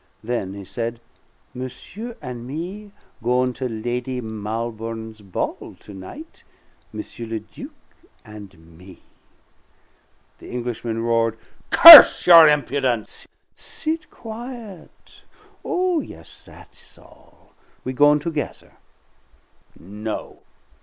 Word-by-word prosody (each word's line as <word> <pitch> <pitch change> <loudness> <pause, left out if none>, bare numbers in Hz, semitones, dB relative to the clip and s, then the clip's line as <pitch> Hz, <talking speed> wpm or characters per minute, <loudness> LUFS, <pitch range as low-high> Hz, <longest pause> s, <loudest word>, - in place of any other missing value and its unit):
Then 110 -5 -4
he 100 -1 -10
said: 115 +3 -5 0.5
"Monsieur 175 - -9
and 125 -2 -8
me 180 +9 -7 0.3
goin' 125 +2 0
to 130 0 -5
Lady 120 +3 -4
Malbourne's 110 0 -6
ball 95 -3 -6
to 105 - -14
night 265 - -12 0.5
M. - - -7 0.3
le 115 -1 -4
Duc 265 - -12 0.6
and 95 -7 -15
me!" 95 0 -16 1.4
The - - -13
Englishman 120 -2 -5
roared, 115 -1 0 0.3
"Curse 330 -3 +11
your 170 -2 +9
impudence!" 135 -5 -2 0.3
"Sit 315 0 -6
quiet. 230 -4 -12 0.4
Oh, 360 -2 -1
yes, - - -12
that's - - -18
all; - - -23 0.3
we 130 - -5
goin' 145 +2 +4
together." 150 0 -6 1.1
"No!" 105 +4 -8
120 Hz, 100 wpm, -21 LUFS, 110-165 Hz, 1.4 s, Curse